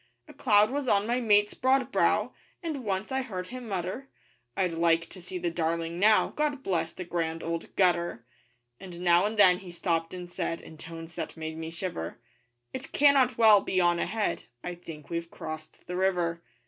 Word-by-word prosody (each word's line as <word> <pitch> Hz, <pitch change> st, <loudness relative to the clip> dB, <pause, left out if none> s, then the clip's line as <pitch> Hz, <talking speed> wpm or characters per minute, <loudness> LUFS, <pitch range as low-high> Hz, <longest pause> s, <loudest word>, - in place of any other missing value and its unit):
A -, -, -12 dB
cloud 210 Hz, -2 st, +4 dB
was 280 Hz, -1 st, -2 dB
on 205 Hz, -3 st, +3 dB
my 240 Hz, +2 st, +1 dB
mate's 210 Hz, -3 st, +3 dB
broad 260 Hz, 0 st, +2 dB
brow, -, -, +2 dB, 0.3 s
And 305 Hz, -6 st, -3 dB
once 200 Hz, +2 st, -2 dB
I 265 Hz, 0 st, +1 dB
heard 185 Hz, -8 st, -5 dB
him 250 Hz, -1 st, -7 dB
mutter: 195 Hz, +7 st, -4 dB, 0.5 s
'I'd 180 Hz, -3 st, +1 dB
like 165 Hz, 0 st, +2 dB
to 185 Hz, -, -11 dB
see 180 Hz, +1 st, -5 dB
the 175 Hz, -1 st, -2 dB
Darling 165 Hz, 0 st, -2 dB
now, 215 Hz, +2 st, +5 dB
'God 290 Hz, -2 st, -2 dB
bless 165 Hz, -6 st, 0 dB
the 185 Hz, -, -7 dB
Grand 165 Hz, -2 st, -2 dB
Old 165 Hz, 0 st, -4 dB
Gutter!' 175 Hz, -10 st, +1 dB, 0.5 s
And 180 Hz, -2 st, -9 dB
now 175 Hz, +2 st, +4 dB
and 220 Hz, +1 st, -5 dB
then 180 Hz, -3 st, +6 dB
he 185 Hz, -3 st, -10 dB
stopped 165 Hz, -1 st, -1 dB
and 180 Hz, -1 st, -7 dB
said 170 Hz, -1 st, -3 dB
In 160 Hz, -, -13 dB
tones 165 Hz, +1 st, -9 dB
that -, -, -6 dB
made 160 Hz, 0 st, -5 dB
me 160 Hz, 0 st, -5 dB
shiver 165 Hz, -, -5 dB, 0.6 s
'It 260 Hz, +1 st, -6 dB
cannot 275 Hz, -3 st, +4 dB
well 215 Hz, -3 st, +7 dB
be 185 Hz, -, 0 dB
on 175 Hz, -1 st, +3 dB
ahead, 215 Hz, +4 st, -1 dB, 0.2 s
'_I 175 Hz, 0 st, -6 dB
think 155 Hz, -3 st, -10 dB
we've 170 Hz, 0 st, -3 dB
crossed 155 Hz, -1 st, -8 dB
the 180 Hz, -, -5 dB
river. 175 Hz, -3 st, 0 dB
180 Hz, 190 wpm, -28 LUFS, 170-215 Hz, 0.6 s, well